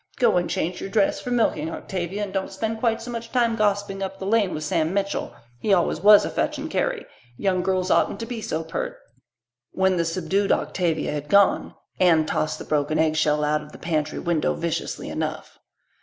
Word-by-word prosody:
Go 245 - +3
and 175 - 0
change 175 +3 -2
your - - -5
dress 200 0 +1
for - - -5
milking, 225 -10 +1
Octavia, 185 +4 -4
and 195 -2 -5
don't 195 -1 -2
spend 220 +3 -3
quite 225 -1 0
so 245 - -6
much 230 -1 -6
time 235 -3 +2
gossiping 205 -2 0
up 195 0 -4
the 190 - -6
lane 205 -2 +2
with 155 - -4
Sam 160 +3 0
Mitchell. 200 0 -2 0.2
He 205 - +2
always 175 - 0
was 205 +1 +8
a - - -3
fetch - - -1
and - - -5
carry. - - -1 0.3
Young 185 -2 +1
girls 185 0 0
oughtn't - - +2
to - - -3
be 235 -2 -5
so 160 -5 -2
pert." 160 - -4 0.8
When 190 -1 +2
the 170 - +1
subdued 185 +4 0
Octavia 170 -5 0
had 150 0 -5
gone, 200 +2 +3 0.2
Anne 165 -4 +4
tossed 155 0 -1
the - - -8
broken 150 0 0
eggshell 155 -1 +2
out 150 0 +1
of 150 0 -13
the - - -10
pantry 155 -2 -2
window 170 -3 0
viciously 170 -1 -3
enough. - - -5
190 Hz, 200 wpm, -24 LUFS, 160-205 Hz, 0.8 s, was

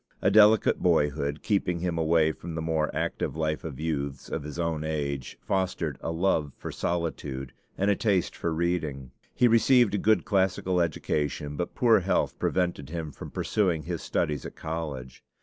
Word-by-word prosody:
A - - +2
delicate 110 0 +6
boyhood, 75 -3 +1
keeping 90 -4 0
him 90 -1 -1
away 80 0 +3
from 80 +1 -8
the 80 - -2
more 80 -1 0
active - - -2
life 80 +1 -1
of 75 -6 -6
youths 70 -4 -3
of - - -3
his 75 +1 -7
own 85 -3 -1
age, 70 -4 -3
fostered, 90 -6 -1
a - - -3
love 80 -4 +1
for - - -6
solitude 75 -6 -3 0.2
and 100 +2 +2
a - - +3
taste 100 -5 +1
for 85 - -2
reading. 80 -6 -2 0.2
He 125 - +5
received 120 0 +5
a 105 - +1
good 110 -5 +3
classical 95 -2 +1
education; 75 -2 -1
but 85 - -4
poor 115 -3 +5
health 95 +1 0
prevented 90 -7 -1
him 80 -2 -4
from - - -9
pursuing 90 -7 0
his - - -4
studies 75 -1 -1
at - - -8
college. 75 -6 -5
80 Hz, 170 wpm, -27 LUFS, 75-90 Hz, 0.2 s, delicate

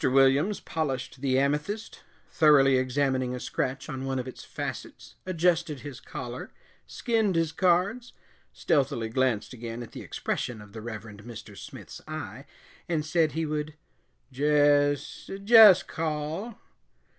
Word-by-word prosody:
Williams 135 +9 +4
polished 135 -4 -3
the 130 -2 +1
amethyst, 150 +11 -1 0.3
thoroughly 140 -4 +5
examining 130 -1 0
a - - -5
scratch 130 +2 -3
on 135 -4 -5
one 135 0 -2
of 130 0 -3
its 130 - -9
facets, - - -7
adjusted 170 -4 +1
his 140 -4 -8
collar, - - -7 0.4
skinned 225 -6 0
his 165 -2 +1
cards, 185 +8 +1 0.4
stealthily 120 -6 0
glanced 130 -2 0
again 115 0 -6
at 115 - -12
the - - -8
expression 120 -3 -3
of 105 -1 -13
the 110 - -7
Reverend 110 -2 -8
Mr. 110 -2 -10
Smith's - - -10
eye, 135 -5 -7 0.4
and 155 -3 0
said 160 0 +2
he 160 0 -1
would 150 0 -3 0.6
"Jess 145 +1 +2
jess 215 -3 +9
call." 160 +8 -4
145 Hz, 135 wpm, -27 LUFS, 130-160 Hz, 0.6 s, jess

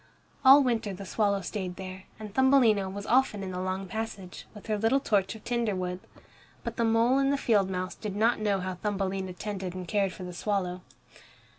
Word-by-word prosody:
All 275 +1 +9
winter 225 -5 -1
the 195 +2 -8
swallow 200 +1 +1
stayed 190 -3 -4
there, 185 0 -8
and 210 -2 -8
Thumbelina 240 -7 +4
was 200 +1 -6
often 235 -5 +2
in 190 - -4
the 180 - -4
long 185 +1 -3
passage, 195 -2 -6
with 210 - -11
her 215 - 0
little 225 +6 +3
torch 205 -6 0
of 220 - -12
tinder 235 -4 0
wood. 180 0 -3 0.6
But - - -5
the 235 - +1
mole 230 +4 +3
and 275 0 +2
the 280 - +1
field 205 -7 +2
mouse 185 0 -3
did 210 -3 -6
not 225 +3 +2
know 205 -3 0
how 185 0 -3
Thumbelina 190 -1 -2
tended 190 -1 -5
and 180 -1 -6
cared 195 0 +1
for 185 - -9
the 180 0 -6
swallow. 185 -2 -2
200 Hz, 200 wpm, -28 LUFS, 185-225 Hz, 0.6 s, All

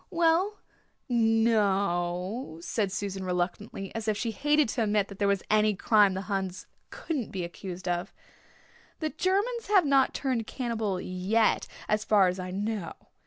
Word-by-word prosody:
"Well, 345 +4 +2 0.5
no 225 -1 +3
o 185 +1 -1
o," - - -12
said 195 +3 -1
Susan 195 -1 -3
reluctantly, 185 +2 -3
as 225 0 -4
if 215 -1 +1
she 230 0 -2
hated 295 +5 +2
to 235 - -1
admit 210 -2 +1
that 200 - -11
there 200 - +2
was 200 -2 +1
any 215 -1 +4
crime 205 -1 +4
the 190 - -2
Huns 190 -2 -3 0.2
couldn't 285 -9 -4
be 190 -3 -4
accused 180 +2 -7
of. 175 0 -1 0.9
"The 310 -2 -2
Germans 415 +6 0
have 390 -5 +5
not 275 -2 +3
turned 250 -5 -1
cannibal 225 -7 -2
yet 190 +5 +1 0.2
as 215 0 +1
far 205 -4 +4
as 180 +1 -2
I 185 0 -4
know. 200 -1 -3
210 Hz, 165 wpm, -28 LUFS, 190-235 Hz, 0.9 s, have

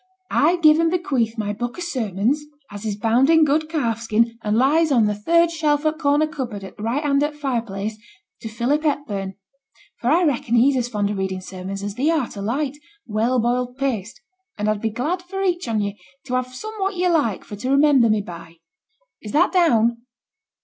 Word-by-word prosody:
I 320 +5 +4
give 315 -2 +5
and 330 0 +3
bequeath 270 - -1
my 205 -1 -2
book 240 - -5
o' - - -7
sermons, 250 - -1 0.3
as 205 +2 -6
is 205 - -2
bound 230 +6 +2
in 320 -1 +6
good 310 +2 +1
calfskin, 230 -5 0
and 210 0 0
lies 300 +5 +3
on 235 -5 +4
the 210 - +1
third 335 +11 +2
shelf 305 -2 0
o' 310 - +3
corner 295 -1 +2
cupboard 250 -9 -5
at 190 - -10
the - - -11
right 240 +7 -1
hand 280 -1 +2
o' 295 - +1
t' 295 - -15
fire 270 -5 -1
place, 215 0 -5 0.4
to 225 - -7
Philip 245 +7 0
Hepburn; 210 -11 -2 0.6
for 245 - 0
I 335 +5 +4
reckon 245 -6 +1
he's 260 +4 +4
as 245 -2 0
fond 205 -3 -1
o' - - -1
reading 190 -1 -2
sermons 190 +1 -7
as 205 0 -4
thee 265 +8 0
art 310 -7 0
o' 200 - -6
light, 270 +7 -2 0.3
well 230 +4 +1
boiled 245 +2 -1
paste, 235 -6 -3 0.4
and 210 0 -1
I'd 215 -1 0
be 225 - 0
glad 295 - -2
for 385 +2 -5
each 355 -5 0
on 220 -2 0
ye 205 0 -4 0.3
to 255 - -5
have 255 0 0
somewhat 400 +4 -3
ye 360 0 +1
like 295 - +1
for 205 - -8
to 255 +5 -4
remember 275 -4 +5
me 215 -1 +2
by. 170 -3 -10 0.7
Is 210 - -8
that 330 +5 +4
down? 235 - +3
250 Hz, 210 wpm, -22 LUFS, 215-305 Hz, 0.7 s, in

